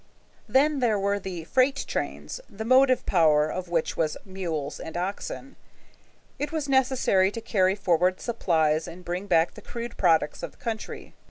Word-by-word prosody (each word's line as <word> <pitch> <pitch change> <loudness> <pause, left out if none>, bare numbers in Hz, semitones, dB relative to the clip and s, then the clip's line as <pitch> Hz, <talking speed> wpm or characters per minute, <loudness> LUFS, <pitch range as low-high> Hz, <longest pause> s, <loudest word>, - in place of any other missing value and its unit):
Then 280 +5 +3
there 230 -4 +2
were 200 +1 0
the 180 -4 -6
freight 260 - +1
trains, - - -4
the 220 +2 -7
motive 255 +1 +4
power 155 -4 +4
of 185 -1 -5
which 165 -2 0
was 155 -2 0
mules 170 -7 -4
and 160 +1 -6
oxen. 200 +8 -5 0.8
It 290 0 -2
was 315 -3 -2
necessary 260 -8 +3
to 230 - -6
carry 190 -4 +1
forward 180 -1 +1
supplies 160 -9 +1
and 180 +2 -10
bring 180 +3 -4
back 165 -3 +3
the - - -12
crude 235 0 -7
products 165 -5 +2
of - - -6
the - - -25
country. 220 -2 -6
190 Hz, 165 wpm, -26 LUFS, 170-240 Hz, 0.8 s, motive